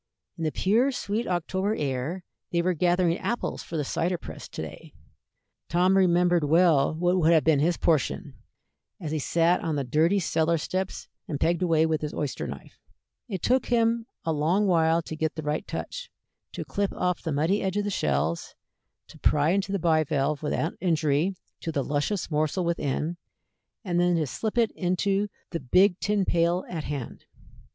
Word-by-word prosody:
In 165 - -4
the 155 - 0
pure, 230 - +2
sweet 225 -2 -2
October 190 +4 -1
air 145 +6 -3 0.3
they 170 -1 +1
were 185 +1 +2
gathering 175 +1 +2
apples 240 - -2
for 165 - -6
the 150 - 0
cider 175 +6 -1
press - - -9
to - - -6
day. - - -10 0.7
Tom 180 +2 +3
remembered 175 -2 +3
well 160 -1 +4
what 175 +2 +2
would 165 -1 +4
have 160 -2 +5
been 155 -3 +4
his 170 +3 +2
portion, 155 -7 0 0.7
as 155 -4 -5
he 155 - -1
sat 170 +4 +2
on 160 -3 -1
the 140 - -1
dirty 160 +9 +2
cellar 165 -2 +1
steps 185 +4 -3 0.2
and 145 -4 -3
pegged 170 +1 +1
away 165 -3 +3
with 160 -1 0
his 150 -1 -4
oyster 145 -3 -3
knife. - - -10 0.5
It 190 -7 -5
took 255 +1 +2
him 230 -1 +2 0.2
a 165 - +1
long 165 +8 +2
while 165 -2 +3
to 160 - -6
get 160 0 -2
the 155 - -5
right 150 +1 -2
touch, - - -5 0.4
to - - -5
clip 200 -1 -1
off 180 -1 -1
the 160 - -3
muddy 160 +8 +1
edge 190 +1 -1
of 205 - +1
the 205 - -2
shells, 75 - -1 0.5
to - - -16
pry 150 +2 +3
into 195 +1 0
the 200 - +1
bivalve 155 -4 +1
without 155 +2 -1
injury 165 0 +1 0.2
to 165 - -4
the 140 -3 -1
luscious 150 +7 -1
morsel 155 +4 0
within, 170 0 -1 0.7
and 175 -2 0
then 175 0 +3
to 160 -2 +1
slip 215 - -4
it 230 -2 +3
into 195 +3 0 0.2
the 165 - -2
big 180 +8 +3
tin 200 +2 +1
pail 170 +1 +1
at 160 -4 -5
hand. 140 -5 -6
170 Hz, 180 wpm, -26 LUFS, 155-185 Hz, 0.7 s, have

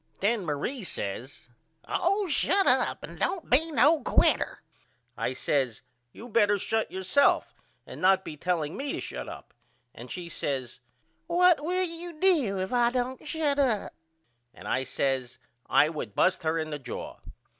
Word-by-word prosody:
Then 210 +1 +1
Marie 165 - -3
says 125 - -5 0.4
Oh, 395 +3 +1
shut 385 +5 +2
up - - +3
and - - -9
don't 360 -4 -2
be 310 +6 +5
no 300 +1 +4
quiter. - - +2 0.5
I - - -2
says 130 -6 -1 0.3
You 230 - -11
better 205 -3 +3
shut 220 +3 -1
up - - -28
yourself 190 +10 +2 0.3
and - - -10
not 190 +1 +4
be 155 - -6
telling 160 -1 -2
me 280 +1 -3
to - - -3
shut - - -6
up, - - -11 0.4
and 120 +2 -11
she 175 -2 -6
says 135 -6 -4 0.5
What 350 -2 +4
will 365 +3 +1
you 335 -1 -8
do 305 - +3
if 190 +4 -3
I 240 -1 +4
don't 255 +3 -3
shut 295 -3 0
up? 245 -7 +1 0.6
And - - -11
I 130 - 0
says 130 -3 -2 0.3
I 150 - +5
would 145 -10 -6
bust 185 0 +2
her 160 -1 0
in 155 -1 -3
the 150 - -4
jaw. 125 -3 -7
205 Hz, 165 wpm, -28 LUFS, -, 0.6 s, be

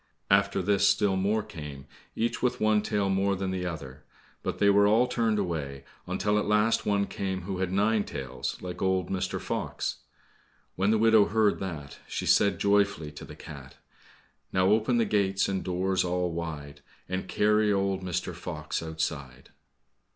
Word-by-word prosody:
After 100 -1 +3
this 100 +1 +3
still 100 -1 +2
more 105 +3 +1
came, 75 -3 -9 0.3
each 115 +1 -1
with 125 0 0
one 110 -1 +3
tail 105 -2 0
more 95 +1 +1
than 95 0 -2
the 90 -1 -2
other, 70 -4 -7 0.4
but - - -3
they 100 - +3
were 100 0 +5
all 110 +4 +4
turned 115 -3 0
away, 75 -8 -3 0.2
until 105 +3 +1
at 105 - -2
last 105 +2 +2
one 100 -1 +2
came 95 -2 -4
who 95 0 -4
had 95 -1 -1
nine 105 +2 +2
tails, 65 -7 -5
like 90 -1 -6
old 95 -2 0
Mr. 95 -1 -2
Fox. - - -3 0.8
When 95 +2 +1
the 110 - +4
widow 110 -1 +5
heard 105 -1 +2
that, 80 -7 -6
she - - -4
said 100 - +4
joyfully 100 -6 +1
to 75 - -10
the - - -11
cat, 70 -2 -11 0.7
"Now 95 0 +3
open 110 +3 +3
the 115 - +3
gates 100 -2 +1
and 95 -1 -2
doors 95 +1 0
all 90 0 -1
wide, 75 -4 -6 0.3
And 95 0 -3
carry 105 +1 +2
old 95 -1 0
Mr. 90 -2 -3
Fox - - -4
outside." 80 -5 -5
95 Hz, 170 wpm, -28 LUFS, 90-105 Hz, 0.8 s, were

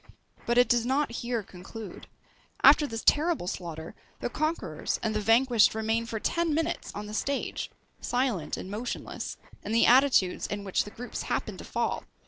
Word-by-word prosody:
But 240 +1 +2
it 245 - +6
does 240 -2 +3
not 270 +2 +1
here 235 -1 -2
conclude. 195 +4 -10 0.6
After 295 +1 +7
this 225 -3 -5
terrible 315 - +3
slaughter, 170 -3 -5 0.3
the 245 - -3
conquerors 300 - -2
and 220 -1 0
the 215 - 0
vanquished 230 0 +4
remain 225 +1 0
for 225 -1 -3
ten 335 +4 0
minutes 325 +2 -2
on 210 - -5
the 210 - -8
stage, 280 +5 -2 0.3
silent 245 - -1
and 190 - -7
motionless, 230 +4 -5 0.3
in 210 - -3
the 230 - +5
attitudes 250 -7 +4
in 205 0 -4
which 195 -2 0
the - - -7
groups 240 +4 -6
happened - - -3
to - - -8
fall! - - -2
230 Hz, 170 wpm, -28 LUFS, 205-265 Hz, 0.6 s, After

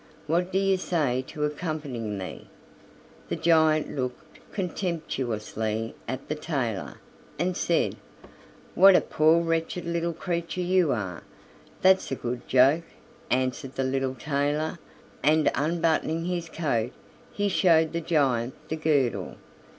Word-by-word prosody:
What 175 +4 0
do 190 - +1
you 195 -1 +3
say 145 -9 0
to 150 - -4
accompanying 145 - -3
me?" 95 -1 -7 0.8
The - - -1
giant 160 -2 +3
looked 130 +4 -5
contemptuously 120 - -3
at 130 +1 -5
the - - -1
tailor, 135 - -3 0.4
and 175 +3 0
said: 170 -1 +1 0.8
"What 195 +1 +8
a - - +6
poor 160 +2 +3
wretched 165 +1 -1
little 170 0 -1
creature 170 +1 -3
you 180 -3 +3
are!" 95 -7 -3 0.6
"That's 190 -4 +4
a - - +1
good 120 -1 -5
joke," 135 +6 +4 0.4
answered 130 +1 -1
the 135 - 0
little 130 0 -1
tailor, 145 +5 -1 0.4
and 155 +1 +4
unbuttoning 165 +1 0
his 175 -2 -2
coat 125 -8 -1 0.4
he 205 0 -1
showed 165 -5 +3
the 170 - -1
giant 135 -7 +1
the 160 - -2
girdle. 145 -6 0
155 Hz, 125 wpm, -27 LUFS, 130-170 Hz, 0.8 s, What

